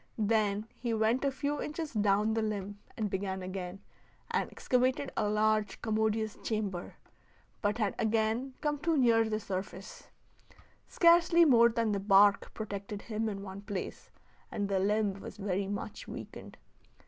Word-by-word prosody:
Then 215 -1 +1
he 235 -1 -1
went 220 +4 +2
a 280 - +3
few 285 +2 -2
inches 305 -1 -4
down 210 0 +2
the 225 - 0
limb 205 -2 -3 0.2
and 215 - 0
began 190 -1 -3
again, 185 0 -6 0.5
and - - 0
excavated 255 +2 0
a 210 - +1
large, 215 -1 +1
commodious 220 -1 0
chamber, 205 -5 -3 0.7
but 205 +1 0
had 210 -4 0
again 225 +4 0
come 295 -1 -1
too 330 +1 +1
near 230 -3 +4
the 215 0 -1
surface; 190 0 -6 0.8
scarcely 340 0 +5
more 235 -5 +6
than 230 -2 0
the 200 - 0
bark 200 0 +4
protected 200 -1 -5
him 220 -1 -2
in 195 -1 -5
one 195 0 -8
place, 200 -2 -6 0.4
and 200 -1 -2
the 195 -1 +1
limb 205 0 +1
was 195 - -9
very 195 -1 -1
much 200 0 -5
weakened. - - -9
215 Hz, 150 wpm, -31 LUFS, 200-230 Hz, 0.8 s, more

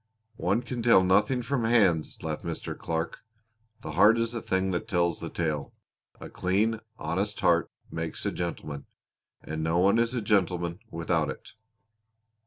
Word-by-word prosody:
"One 100 +7 +1
can 125 -2 -4
tell 115 -5 +6
nothing 105 +7 +3
from 125 0 -1
hands," 100 -9 +3
laughed - - -3
Mr. - - -4
Clark. 80 0 -3 0.6
"The - - -6
heart 110 +3 +6
is 115 0 0
the 115 -1 -4
thing 95 -1 0
that 90 - -2
tells 85 -3 +1
the - - -5
tale. 75 -4 -2 0.5
A - - -8
clean, 105 +5 0 0.2
honest 95 +7 -2
heart 85 -1 +3 0.2
makes 80 0 -4
a - - +1
gentleman, 75 -5 -5 0.6
and 80 0 -4
no 80 +2 +1
one 100 +5 +4
is 120 +2 +1
a 120 - 0
gentleman 90 -4 +1
without 85 0 0
it." - - -8
95 Hz, 160 wpm, -28 LUFS, 85-115 Hz, 0.6 s, tell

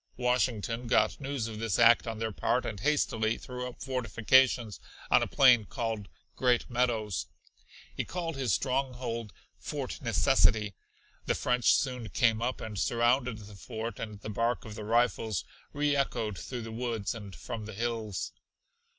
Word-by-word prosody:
Washington 125 -1 0
got 110 +3 +2
news 135 -4 -2
of 110 -1 -7
this 110 -5 0
act 115 0 +6
on 115 -1 -3
their 110 0 -2
part, - - 0
and 100 - -4
hastily 115 -5 +1
threw 125 0 -6
up 125 - -9
fortifications 125 -2 +2 0.3
on - - +6
a - - 0
plain 125 -5 +6
called 110 -2 -4 0.3
Great 125 -2 +2
Meadows. 110 -8 0 0.7
He - - -1
called 170 -2 -4
this 130 -5 -1
stronghold 125 -2 -1 0.3
Fort - - -5
Necessity. 105 -1 +3 0.5
The - - +2
French 125 -1 +3
soon 125 -4 -2
came 115 -3 +2
up 125 +2 -2
and 105 -3 -5
surrounded 120 +3 +2
the 105 -1 -11
fort, 110 +4 -6
and 105 -2 -6
the 110 - -6
bark 115 +3 0
of 110 - -7
the 105 0 -7
rifles 110 -5 +1 0.3
reechoed 140 -7 0
through 120 +4 -6
the 115 - -7
woods 115 -2 -2
and 100 -5 -9
from 110 - -6
the 110 - -7
hills. 115 -3 -3
115 Hz, 155 wpm, -30 LUFS, 110-125 Hz, 0.7 s, act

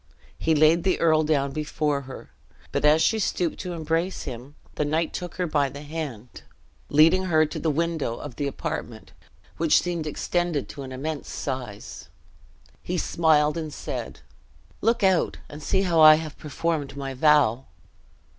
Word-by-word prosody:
He 160 0 +2
laid 155 +3 +4
the 190 - +1
earl 155 -2 +4
down 145 -3 +1
before 150 -1 -1
her; 130 - -10 0.4
but - - -1
as 150 +2 +5
she 220 - +2
stooped 180 -4 -1
to 180 - -5
embrace 165 +3 -2
him, 130 +2 -8 0.2
the - - -1
knight 155 +2 -1
took 180 -1 -6
her 180 - -1
by 145 -4 +1
the 140 +2 -9
hand, 145 -7 -7 0.5
leading 165 +6 +5
her 155 -3 +3
to 150 - -6
the 160 - 0
window 160 -5 -1
of 140 -2 -8
the 145 - -1
apartment 140 - -5 0.5
(which 165 -2 +4
seemed 170 -3 -3
extended 170 -1 -1
to 140 - -8
an 130 -1 -7
immense 145 +3 -5
size), 125 -7 -6 0.7
he 180 - -3
smiled, 155 -2 +2
and 155 -2 -5
said, - - -6 0.6
"Look 230 +1 +1
out 190 -3 +2
and 150 +1 -10
see 190 +6 +1
how 170 -4 +2
I 155 0 +10
have 155 -1 -5
performed 150 -1 -3
my 135 -1 -4
vow!" 135 -3 +3
155 Hz, 165 wpm, -25 LUFS, 145-165 Hz, 0.7 s, I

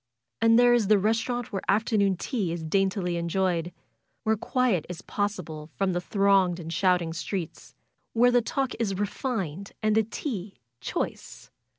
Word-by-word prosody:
And 225 0 +6
there 245 0 +6
is 235 -4 +3
the 210 0 +6
restaurant 230 +4 -1
where 195 - -1
afternoon 200 -2 +2
tea 200 -4 -2
is 170 -1 -4
daintily 185 +1 0
enjoyed; 170 0 0 0.5
where 220 0 +2
quiet 225 -5 +1
is 180 -1 -7
possible 170 -7 -3
from 195 -2 0
the 175 - -1
thronged 195 -2 +2
and 165 -1 -6
shouting 180 -3 +2
streets, 170 +1 -5 0.4
and 230 - +1
where 245 0 +7
the 245 0 +4
talk 265 +2 -1
is 200 -5 -1
refined 200 - -3
and 215 0 +3
the 220 - +5
tea 215 - -5 0.2
choice. 130 - -5
195 Hz, 160 wpm, -27 LUFS, 175-225 Hz, 0.5 s, where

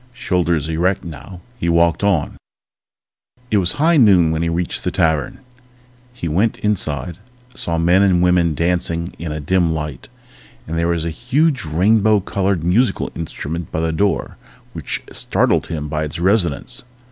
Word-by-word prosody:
Shoulders 85 - 0
erect 85 +4 0
now, 85 +2 -9 0.2
he 85 - -1
walked 85 +1 +2
on... 95 -7 +1 1.2
It 105 - +3
was 90 -1 +2
high 160 +3 +3
noon 95 - +5
when 80 0 -1
he 85 - 0
reached 85 +1 -2
the - - 0
tavern. 80 - 0 0.7
He 120 -9 -6
went 95 +8 +1
inside, 85 -5 -2 0.3
saw 85 -6 -2
men 85 +3 +3
and 90 -3 +3
women 90 -3 +3
dancing 85 +1 -1
in 80 -2 -4
a 75 - -4
dim 85 +2 +1
light, 75 -5 -6 0.6
and 80 - -4
there 85 0 +1
was 85 -1 -1
a 85 - -2
huge, 130 - 0
rainbow 105 +7 +3
colored 95 -2 -1
musical 105 +9 +1
instrument 80 0 -5
by 80 - -2
the 80 0 0
door 100 +4 -1 0.4
which - - -5
startled - - 0
him 75 -2 -4
by 75 +1 -2
its 75 - -6
resonance. 85 - 0
85 Hz, 160 wpm, -19 LUFS, 80-100 Hz, 1.2 s, noon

